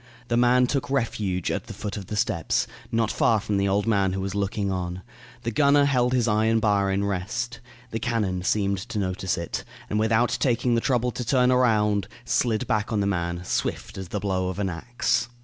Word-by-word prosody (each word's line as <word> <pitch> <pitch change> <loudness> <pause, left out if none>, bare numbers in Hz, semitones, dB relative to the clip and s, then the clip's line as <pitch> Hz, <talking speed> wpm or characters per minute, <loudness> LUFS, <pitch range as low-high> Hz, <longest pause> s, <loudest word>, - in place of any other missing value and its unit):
The 120 - +2
man 125 +1 +4
took 135 +2 -1
refuge 105 -9 -1
at - - -3
the - - -8
foot 105 - -5
of 100 -4 -7
the 105 - -4
steps, 105 -8 0 0.3
not 115 -1 +1
far 110 -2 +3
from 105 -1 -1
the 100 0 +1
old 100 +1 +1
man 100 -4 +2
who 95 - -2
was 95 0 -3
looking 100 0 -1
on. 90 0 -3 0.4
The 115 - -1
gunner 140 +3 +4
held 125 -3 +2
his 120 -2 +2
iron 110 +1 +3
bar 100 -2 +2
in 100 +1 0
rest. 110 +6 -3 0.3
The 115 - -2
cannon 105 -7 -1
seemed 100 0 +1
to 110 +2 -6
notice 95 -2 -1
it, 85 - -4 0.3
and 105 - +1
without 110 +2 +2
taking 120 -1 +2
the 115 - +2
trouble 125 -1 +1
to 125 - -4
turn 125 +1 +3
around, 105 -5 +2 0.2
slid 120 -1 +1
back 105 -2 0
on 110 - +1
the 100 - +1
man, 85 -2 -1
swift - - -2
as 95 -1 -6
the 105 - -3
blow 95 -2 -1
of 95 - -5
an 100 -2 -1
axe. 120 +7 -1
105 Hz, 210 wpm, -25 LUFS, 95-120 Hz, 0.4 s, man